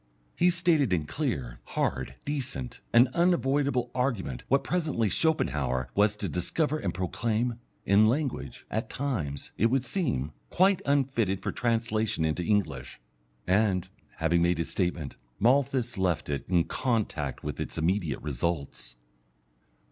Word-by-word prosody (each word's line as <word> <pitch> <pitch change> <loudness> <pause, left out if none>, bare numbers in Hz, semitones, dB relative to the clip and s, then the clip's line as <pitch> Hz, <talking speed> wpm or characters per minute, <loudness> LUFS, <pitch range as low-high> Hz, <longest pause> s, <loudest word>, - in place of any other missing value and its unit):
He 180 - +4
stated 170 - +2
in 80 -4 +1
clear, 75 - -3 0.2
hard, - - -1
decent, 130 - -3
and 120 +2 +7
unavoidable 140 -6 +1
argument 120 - -1
what 135 +1 +3
presently 150 - 0
Schopenhauer 65 - 0
was 105 +5 +3
to 105 -1 -3
discover 145 - 0
and 95 - -1
proclaim, 115 +6 -1 0.3
in 105 +2 +5
language, 120 - -2
at 110 +3 -2
times, 95 - -3
it 115 - +5
would 130 +2 +1
seem, 80 - -1 0.2
quite 190 +1 +3
unfitted 120 -9 +1
for - - -1
translation 110 -5 0
into 80 +2 0
English. 105 +3 -1 0.5
And, 95 -1 +2 0.3
having 85 +1 +2
made 85 0 +3
his 85 - -2
statement, 90 -6 -2 0.2
Malthus 125 -2 +2
left 90 -5 0
it, 70 - -2
in 90 -2 +4
contact 100 - -2
with - - -4
its - - -4
immediate 85 -2 0
results. 70 -3 -3
110 Hz, 135 wpm, -28 LUFS, 85-135 Hz, 0.5 s, and